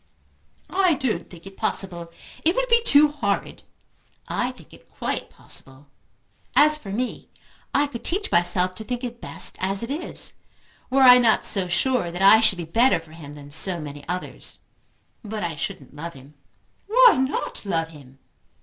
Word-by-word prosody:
"I 370 -4 +3
don't 260 -4 -3
think 170 -1 -14
it 195 0 -11
possible. 170 -4 -2 0.3
It 335 +3 +2
would - - 0
be 470 0 +4
too 300 -9 +5
horrid." 210 -10 -3 0.7
"I - - -1
think - - -18
it - - -18
quite - - -4
possible. 135 +2 -4 0.7
As 305 +1 +6
for 270 -10 -9
me, 245 +6 -4 0.4
I 285 - +2
could 265 -5 -8
teach 400 +4 -3
myself 180 +1 +2
to 220 - -9
think 245 +2 -5
it 240 -1 -6
best - - -2
as 195 +3 -2
it 230 - -5
is, 315 +5 -2 0.6
were 265 +1 +3
I 250 -1 +9
not 230 -3 +2
so 190 -3 -1
sure 235 +2 +1
that 175 +3 -3
I 205 +3 +8
should 220 -4 +2
be 170 - -5
better 230 +7 +2
for 165 -1 -17
him 155 -3 -11
than 145 -1 -12
so 175 +3 +6
many 145 -2 -8
others. 180 +1 -4 0.7
But 215 -1 -5
I 170 -2 -3
shouldn't 145 -1 -6
love 165 +3 -7
him." 135 +2 -15 0.5
"Why 485 0 +6
not 265 +2 -2
love 165 -5 -2
him?" 135 -4 -16
200 Hz, 175 wpm, -23 LUFS, 170-265 Hz, 0.7 s, I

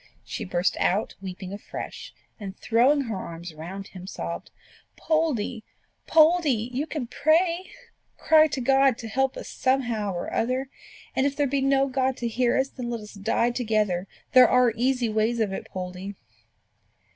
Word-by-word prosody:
She - - -5
burst 180 0 0
out 200 +4 +1
weeping 190 0 -7
afresh, 205 - -7 0.3
and 195 -2 -7
throwing 255 +6 +3
her 230 -6 -3
arms 170 -2 -7
round 180 +6 -8
him, 185 -1 -10
sobbed 85 - -5 0.5
"Poldie, 260 -8 0 0.4
Poldie! 310 -8 +4
you 280 +5 -1
can 300 -5 -3
pray: 335 +8 +1 0.5
cry 315 -1 +5
to 275 -3 -3
God 270 0 +4
to 225 - -7
help 265 +4 0
us - - -7
somehow 240 -6 0
or 175 - -4
other; 255 +3 -1 0.4
and 265 - +3
if 280 - -3
there 290 - +1
be 275 0 0
no 275 0 +3
God 260 -1 0
to 240 - -2
hear 240 +1 +1
us, 265 +1 +1
then 250 -3 -6
let 235 -2 -3
us 210 - -11
die 225 +4 +1
together. 215 -6 0 0.3
There 255 -2 +8
are 250 -2 +4
easy 250 0 +1
ways 220 +2 0
of 210 -3 0
it, - - -5
Poldie." 185 +2 -6
240 Hz, 165 wpm, -26 LUFS, 200-270 Hz, 0.5 s, There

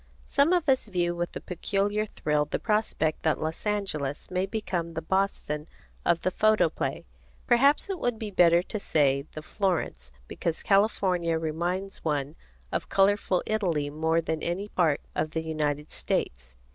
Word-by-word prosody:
Some 280 +4 +3
of 350 -3 +2
us 260 -4 +3
view 175 -3 0
with 175 0 -3
a - - -3
peculiar 205 +4 -1
thrill 150 -6 0
the - - -2
prospect 210 -8 0
that 155 - +1
Los 160 +6 -3
Angeles 155 -10 -2
may 185 +1 0
become 175 -7 -3
the 160 - -2
Boston 160 -4 -1 0.4
of 170 -1 +2
the 185 - +1
photoplay. 215 +3 +1 0.4
Perhaps 275 +4 +4
it 385 -3 -3
would 245 -4 0
be 215 -1 -5
better 175 -2 +5
to 215 - -5
say 140 -5 +2
the 155 - -7
Florence, 170 - -2 0.2
because 165 -1 -3
California 185 -5 +2
reminds 175 +5 -3
one 145 -1 -1 0.4
of - - -2
colorful 195 -2 +2
Italy 170 -10 0
more 160 +2 +1
than 160 -1 -2
of - - -1
any 195 +4 -3
part 165 -7 +2
of 155 - -1
the 160 +1 -3
United 150 -2 -2
States. 65 0 -2
175 Hz, 160 wpm, -27 LUFS, 155-205 Hz, 0.4 s, better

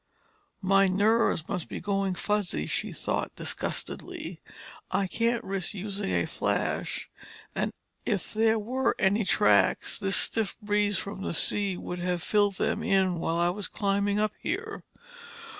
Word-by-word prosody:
"My 195 +1 +5
nerves 200 -3 +2
must 180 -5 -3
be - - -4
going 195 -2 0
fuzzy," 205 - 0
she - - -1
thought - - -2
disgustedly. - - -4 0.5
"I 200 - +1
can't 230 +4 0
risk 195 0 -2
using 200 0 -3
a - - +1
flash, - - -1 0.5
and - - -1 0.3
if 210 -3 -2
there 220 +1 +3
were 255 +5 0
any 200 +3 +3
tracks 105 - +3
this 195 0 0
stiff 225 -3 0
breeze 205 -1 +1
from 200 -1 -5
the 170 - -2
sea 200 0 +3
would 180 0 -5
have 175 -1 -1
filled 205 -2 +2
them - - 0
in 190 -3 +2
while 165 0 0
I 175 0 +3
was 200 +2 -3
climbing 200 0 0
up 215 0 +2
here. - - -3
200 Hz, 145 wpm, -28 LUFS, 185-210 Hz, 0.5 s, My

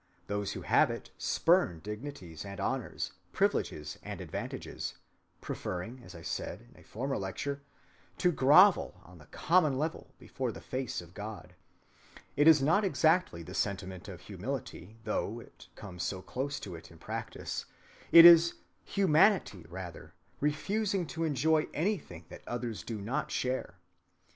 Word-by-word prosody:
Those 100 0 -2
who - - -6
have - - +4
it - - -6
spurn 165 - +2
dignities 105 - -7
and 100 -1 -8
honors, - - -2 0.2
privileges 75 0 0
and - - -7
advantages, - - -5 0.5
preferring, 110 +8 -5
as 90 -4 -12
I 85 - -10
said - - -4
in - - -21
a - - -17
former 135 +5 -3
lecture, 140 +9 -4 0.6
to 180 - +3
grovel 155 - +5
on 90 -1 -15
the 75 - -16
common 160 -6 +2
level 155 +3 -4
before 130 -3 -4
the - - -9
face 130 -6 -4
of 85 0 -14
God. 105 -3 -8 0.8
It 145 +2 +4
is 155 -4 +7
not 170 +9 +4
exactly 165 - +2
the 90 - -9
sentiment 95 -2 -3
of - - -9
humility, 105 +6 -6
though 110 +1 -2
it - - -15
comes 90 -3 -8
so 95 +2 -3
close 140 +2 -3
to 95 - -7
it 80 - -10
in - - -15
practice. - - -5 0.5
It 170 0 +11
is 170 0 +9 0.3
humanity, 175 - +3
rather, 90 -1 -8 0.2
refusing 190 +6 0
to 165 -1 -1
enjoy 155 +2 +2
anything 155 - -2
that - - -10
others 120 -2 -3
do 115 -2 -5
not 115 +8 -2
share. 125 -8 -2
125 Hz, 150 wpm, -31 LUFS, -, 0.8 s, It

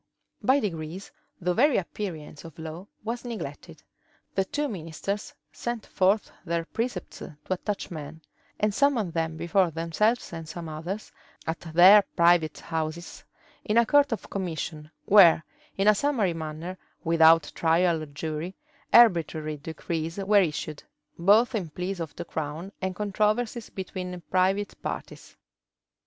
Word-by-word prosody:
By 265 +2 +4
degrees, 170 - -5 0.3
the 180 0 0
very 270 +7 +4
appearance 170 -6 -5
of 165 -3 -12
law 160 +4 -7 0.2
was 235 +2 -4
neglected: 195 - -7 0.5
the 195 - +2
two 295 +8 -2
ministers 195 - -4 0.2
sent 240 -3 -4
forth 195 +3 +1
their 170 -1 -2
precepts 225 -2 -4
to - - -9 0.2
attach 195 +2 -2
men, 155 0 -7 0.4
and 210 -1 +1
summon 245 -8 +2
them 160 -1 -2
before 170 +2 +2
themselves 170 +8 0
and 165 -2 -7
some 170 +1 -6
others, 165 +7 -5 0.3
at 160 0 -2
their 175 +5 +7
private 170 -3 +4
houses, 160 +1 -4 0.4
in 215 - 0
a 235 - +6
court 285 +3 +4
of 225 - -3
commission, 160 -5 -4 0.2
where, 175 -6 +7 0.3
in 195 +1 +2
a 215 - +8
summary 215 -5 +1
manner, 165 +3 -6 0.2
without 165 -2 +5
trial 165 0 +2
or 155 - -6
jury, 155 +5 -5 0.4
arbitrary 160 -9 +4
decrees 160 +2 -4
were 200 +1 +4
issued, 155 -3 -3 0.4
both 210 +8 +5
in 190 -8 -2
pleas 180 +4 -4
of 165 -3 -5
the 175 - -6
crown 160 +4 -5
and 190 -1 -2
controversies 215 +4 0
between 180 -1 -6
private 190 +2 +1
parties. - - -6
180 Hz, 140 wpm, -27 LUFS, 160-210 Hz, 0.5 s, a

